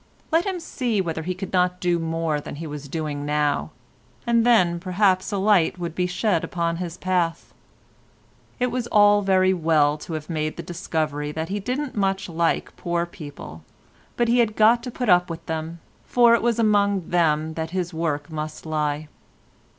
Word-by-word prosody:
Let 330 +4 +2
him 375 -2 -2
see 245 -9 -2
whether 165 -3 -2
he 180 +3 -3
could 195 +1 -7
not 180 0 +2
do 175 -1 +1
more 165 -2 -1
than - - -8
he 165 +3 -6
was 145 -2 -7
doing 150 -2 -3
now, 150 0 0 0.6
and 235 -1 +3
then 185 -8 +4
perhaps 185 +1 +1
a 200 - -1
light 195 -4 +3
would 170 -2 -4
be 180 +1 0
shed 180 -1 0
upon 170 -1 -2
his 175 -1 -5
path. 180 -3 -1 1.1
It 250 0 +1
was 250 -2 -2
all 205 -1 +5
very 190 -1 +3
well 155 -4 +2
to 165 - -7
have 155 -1 -5
made 155 -2 -3
the - - -5
discovery 155 -4 -3
that 160 +2 -4
he 205 +1 -2
didn't 255 +7 -3
very 205 - -1
much 195 0 0
like 170 0 -1
poor 170 0 -1
people, 145 - -10 0.5
but 240 - +2
he 240 +1 +3
had 220 -3 +2
got 225 +2 +5
to 250 - -6
put 245 0 -4
up 180 -1 +4
with 165 -1 -7
them, 160 +1 -4 0.2
for 240 -1 +4
it 235 - +3
was 235 -1 +1
among 200 -5 +2
them 160 -2 +2
that 160 0 -4
his 180 -1 -3
work 160 -2 -2
must 155 0 -5
lie. 150 -1 -2
175 Hz, 190 wpm, -23 LUFS, 160-205 Hz, 1.1 s, all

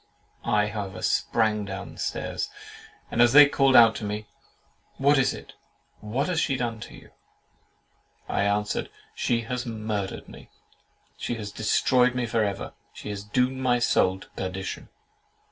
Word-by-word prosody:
I 105 -1 +2
however 100 -3 -5
sprang 110 -2 +1
down 95 -1 -7
stairs, - - -3 0.6
and 120 - +2
as 120 0 +5
they 145 0 +10
called 135 -2 +3
out 115 -1 +8
to - - -7
me, 105 +1 -4 0.7
"What 140 +1 +4
is 130 - +3
it?—What 115 +6 -7
has 180 -3 0
she 140 -4 +1
done 120 -3 -3
to - - -10
you?" - - -16 1.2
I - - 0
answered, 105 0 0 0.2
"She 115 -1 0
has 125 +2 -4
murdered 110 -3 -4
me!—She 120 - -10
has 105 -3 -6
destroyed 125 +4 +2
me 125 -1 0
for 115 -1 +1
ever!—She 100 +1 -6
has 100 -1 -5
doomed 125 +5 0
my 125 -2 +2
soul 95 -5 +2
to - - -13
perdition!" 95 0 -5
110 Hz, 145 wpm, -26 LUFS, 105-125 Hz, 1.2 s, they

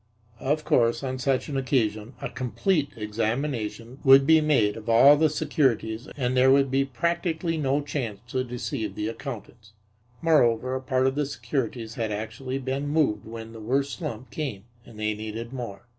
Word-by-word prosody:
Of 150 +3 -1
course, 115 0 +2
on 130 -1 -3
such 130 0 0
an 145 - -4
occasion 120 -4 0
a - - -1
complete 145 - 0
examination 115 +2 -3
would 135 0 +7
be 160 +1 +6
made 125 -9 +2
of 115 0 -7
all 135 +6 +8
the 155 +1 +3
securities 125 -5 0
and 125 -2 0
there 130 +1 +5
would 135 0 +4
be 135 +1 +3
practically 165 +4 -1
no 145 -2 +1
chance 130 -8 -4
to 130 +1 -1
deceive 120 -4 -4
the 105 - -2
accountants. 115 -3 -8 0.5
Moreover, 130 -5 +3
a 130 - -2
part 130 0 +1
of 130 - +2
the 145 0 -1
securities 125 -5 -3
had 110 -1 -1
actually 130 +5 -4
been 135 +2 -3
moved 145 -9 +1
when 115 0 -8
the 115 - -9
worst 135 +7 -1
slump 130 -7 -6
came 130 -11 -4 0.2
and 110 -3 -13
they 110 0 0
needed 110 +3 -6
more. 115 -7 -6
130 Hz, 175 wpm, -26 LUFS, 115-140 Hz, 0.5 s, all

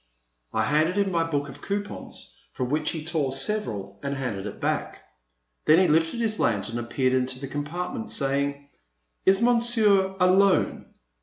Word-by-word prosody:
*' - - -48
I - - +1
handed 155 +5 +2
him 200 -1 +2
my 165 -2 +2
book 145 -3 -1
of 140 0 -11
coupons 205 +1 -5 0.2
from 125 -1 -3
which 150 +1 0
he 155 -2 -4
tore 155 -5 0
several 130 - -3
and 140 0 -3
handed 110 -7 -3
it - - -8
back. - - -2 0.6
Then 155 - +6
he 185 0 +5
lifted 165 +8 +2
his 220 -2 +1
lantern 110 +1 0
and 120 0 -6
peered 130 0 +1
into 130 0 0
the 135 - -5
compartment 180 - -4
saying: 140 -2 -1 0.6
Is 195 +4 +5
Monsieur 225 -5 +3
alone 185 +1 +3
155 Hz, 165 wpm, -26 LUFS, 135-195 Hz, 0.6 s, Then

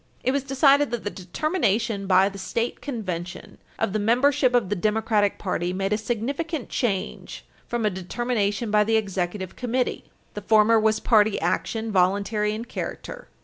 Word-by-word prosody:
It 260 - +2
was 280 +1 0
decided 275 +2 +3
that 240 -1 -4
the 205 - -3
determination 215 - -1
by 190 0 +5
the 200 0 -7
state 230 +5 -3
convention 185 - -6 0.2
of 195 - -1
the 215 - 0
membership 255 +4 +3
of 225 -7 +2
the 205 - 0
Democratic 215 +1 +1
party 180 -2 -2
made 195 +2 -1
a - - +2
significant 270 +7 -3
change 200 -7 -3 0.2
from 235 -2 -2
a 210 - +2
determination 205 +3 -2
by 210 0 +4
the 225 +1 +2
Executive 190 -2 -3
Committee. 250 0 -2 0.3
The 210 - -6
former 220 +2 +4
was 220 0 +2
party 220 -3 +3
action, 225 -1 -1
voluntary 205 +3 +1
in 225 +2 -6
character. - - -6
215 Hz, 160 wpm, -24 LUFS, 195-240 Hz, 0.3 s, by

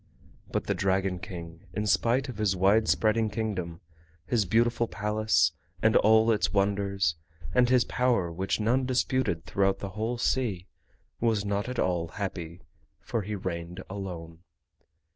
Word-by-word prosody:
But - - -1
the - - 0
Dragon 95 -1 0
King, 85 -1 -9
in 105 +2 -2
spite 120 +6 +2
of 120 -5 -7
his 100 -3 +2
wide 100 +4 +3
spreading 110 0 +2
Kingdom, 90 -7 -3 0.4
his 115 -5 +1
beautiful 115 +3 +2
Palace 105 -6 +1 0.3
and 110 -1 +3
all 110 +1 +5
its 105 - +1
wonders, 100 -4 +1 0.4
and 125 +3 +4
his 125 -1 +5
power 120 -9 +1
which 95 +5 -1
none 125 +4 +1
disputed 130 -9 0
throughout 95 +2 +1
the 100 - -5
whole 110 +5 -3
sea, 115 -7 0 0.5
was 110 -3 +1
not 100 +3 -1
at 125 - -5
all 90 -2 0
happy, 90 -1 -6 0.4
for 115 - -3
he 105 +2 -4
reigned 85 -2 -5
alone. 85 -4 -6
100 Hz, 145 wpm, -28 LUFS, 90-110 Hz, 0.5 s, all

